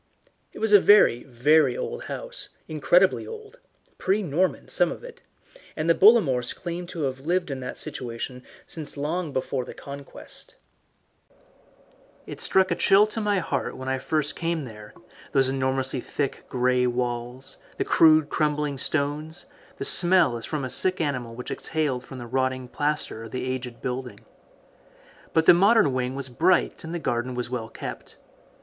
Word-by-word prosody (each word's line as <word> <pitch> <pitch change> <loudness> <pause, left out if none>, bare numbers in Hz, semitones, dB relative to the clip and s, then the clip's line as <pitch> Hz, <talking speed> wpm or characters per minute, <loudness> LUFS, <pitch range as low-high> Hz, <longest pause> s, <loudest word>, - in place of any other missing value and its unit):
It - - -13
was 220 -1 +1
a 205 - +10
very, 195 - +5
very 145 - +3
old 475 0 -5
house, - - -6 0.2
incredibly 175 +5 +2
old 445 +1 -10 0.4
pre 200 +3 +1
Norman, 180 +3 -1
some - - +2
of - - -8
it - - -11 0.5
and 155 +1 -2
the 165 - +6
Bollamores 165 - +4
claimed 175 0 -6
to 165 -4 -5
have 130 -1 -2
lived 170 +3 -1
in 135 - -4
that 125 0 -6
situation 125 +1 -5 0.2
since 155 -3 -7
long 155 +3 -2
before 130 -1 -2
the - - -10
Conquest. 140 0 -10 1.7
It - - -8
struck 190 -1 +3
a - - +2
chill 195 +4 +5
to 215 +1 -5
my 205 -1 +1
heart 170 - -3
when 130 0 -3
first 150 +2 -1
I - - -12
came 165 -3 -2
there, 105 -3 -12 0.4
those 135 -1 +3
enormously 130 0 -1
thick 140 +2 -4
grey 125 0 +1
walls, 120 +1 -4 0.2
the - - -1
rude 155 -2 +6
crumbling 150 -2 -1
stones, 155 - -1 0.3
the - - -3
smell 175 -7 +6
as 115 - -6
from 150 -4 -3
a - - -5
sick 185 0 +3
animal 130 -7 -3
which 125 - -7
exhaled 145 -6 -2
from 135 - -10
the 120 - -7
rotting 130 +1 -1
plaster 145 -6 -2
of 115 - -11
the 130 - -3
aged 130 -2 -5
building. 125 0 -5 1.1
But 160 0 +2
the - - +9
modern 195 - +4
wing 130 0 -2
was 135 -1 -4
bright 170 +9 +1
and 165 - -7
the 175 - -2
garden 125 -5 -2
was 125 0 -4
well 115 -3 -4
kept. - - -8
145 Hz, 165 wpm, -25 LUFS, 130-175 Hz, 1.7 s, a